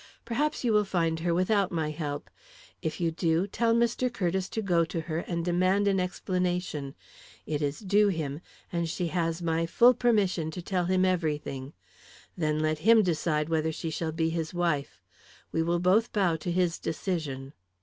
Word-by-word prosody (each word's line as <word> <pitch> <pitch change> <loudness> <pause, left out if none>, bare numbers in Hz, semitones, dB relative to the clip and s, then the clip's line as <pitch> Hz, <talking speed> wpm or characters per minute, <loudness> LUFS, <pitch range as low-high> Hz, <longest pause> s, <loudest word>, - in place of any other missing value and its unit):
Perhaps 295 +6 -1
you 235 -3 +2
will 210 0 +4
find 165 -4 0
her 170 +1 0
without 185 +3 +2
my 160 -3 -1
help. 150 -2 -4 0.5
If 160 - -3
you 170 -2 +1
do, 165 +1 +1
tell 230 +3 +1
Mr. 235 +2 +1
Curtiss 185 -3 -1
to 220 - -3
go 175 -4 +3
to 165 +1 -3
her 160 0 -3
and 170 -1 -3
demand 185 +3 +2
an 195 -1 +2
explanation; 180 -5 -2 0.5
it 150 -1 -2
is 145 0 -1
due 205 +1 +3
him, 155 -5 -2 0.3
and 170 -2 -1
she 175 +1 -2
has 165 0 -1
my 165 0 0
full 240 +8 +6
permission 205 -9 +1
to 180 +3 -6
tell 180 -1 0
him 185 +1 +2
everything. 150 -6 -2 0.6
Then 155 -3 0
let 155 0 0
him 225 +5 +6
decide 155 -3 0
whether 160 -1 0
she 160 +1 -4
shall 160 0 -2
be 160 0 0
his 165 +1 -3
wife. 170 -5 -1 0.5
We 165 - 0
will 170 +1 +1
both 195 +6 +3
bow 190 -6 +2
to 160 +2 -4
his 175 -1 +1
decision." 150 -6 -3
170 Hz, 180 wpm, -28 LUFS, 160-190 Hz, 0.6 s, full